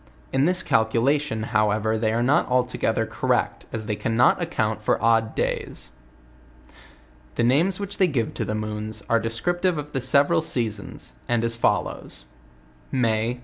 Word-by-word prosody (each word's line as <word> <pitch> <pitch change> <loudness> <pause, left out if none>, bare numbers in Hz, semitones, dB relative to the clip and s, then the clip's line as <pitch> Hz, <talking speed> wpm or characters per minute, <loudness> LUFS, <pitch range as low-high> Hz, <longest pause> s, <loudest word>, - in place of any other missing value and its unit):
In 135 +1 +3
this 180 +2 +2
calculation, 115 +2 +1
however, 110 0 +2
they 110 0 0
are 115 +2 0
not 140 +4 +3
altogether 125 -3 +1
correct, - - -1
as 110 -2 -4
they 105 -1 -2
cannot 115 - +2
account 110 -11 -1
for 105 - +1
odd 115 -1 +2
days. - - -3 1.4
The - - +1
names 160 +11 +2
which 200 +1 -4
they 190 - +5
give 125 -8 -1
to - - -3
the 105 - -3
moons, 110 0 -4
are 115 -1 +2
descriptire 175 - 0
of 150 0 -6
the 135 - -2
several 140 +6 +3
seasons, 110 - -3 0.2
and 120 -1 +1
as 115 0 +1
follows: 115 - -1 0.7
May 115 -1 0
115 Hz, 150 wpm, -24 LUFS, 110-140 Hz, 1.4 s, they